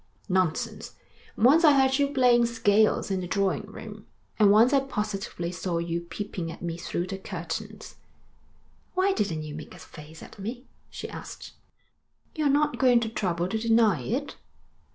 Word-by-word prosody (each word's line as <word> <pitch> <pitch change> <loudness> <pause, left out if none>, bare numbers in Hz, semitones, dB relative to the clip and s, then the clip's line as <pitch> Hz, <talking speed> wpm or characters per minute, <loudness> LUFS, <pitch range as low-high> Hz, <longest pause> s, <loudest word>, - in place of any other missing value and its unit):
'Nonsense. 185 -3 -1 0.4
Once 280 +9 +5
I 305 -3 +7
heard 265 0 +3
you 285 - +3
playing 250 -4 +4
scales 215 -3 +2
in 190 - 0
the 180 - -5
drawing 200 +2 0
room, 210 0 -10 0.3
and 210 -2 +6
once 225 +6 +5
I 275 - +6
positively 210 -8 -4
saw 180 -1 -3
you 170 0 -2
peeping 175 -1 -5
at 165 - -11
me 170 -1 -3
through 175 +1 -3
the 190 +1 -6
curtains.' 205 +4 -7 1.0
'Why 380 +1 +2
didn't 165 - -2
you 150 -1 -7
make 155 +4 -9
a - - -12
face 160 -1 -12
at - - -14
me?' 240 +6 -6 0.2
she - - -7
asked. - - -9 0.8
'You're 305 -3 0
not 295 +1 +1
going 250 -3 +5
to 225 - -2
trouble 180 -5 -1
to 220 - -1
deny 225 -2 +3
it?' 275 +7 -3
210 Hz, 165 wpm, -26 LUFS, 175-245 Hz, 1.0 s, I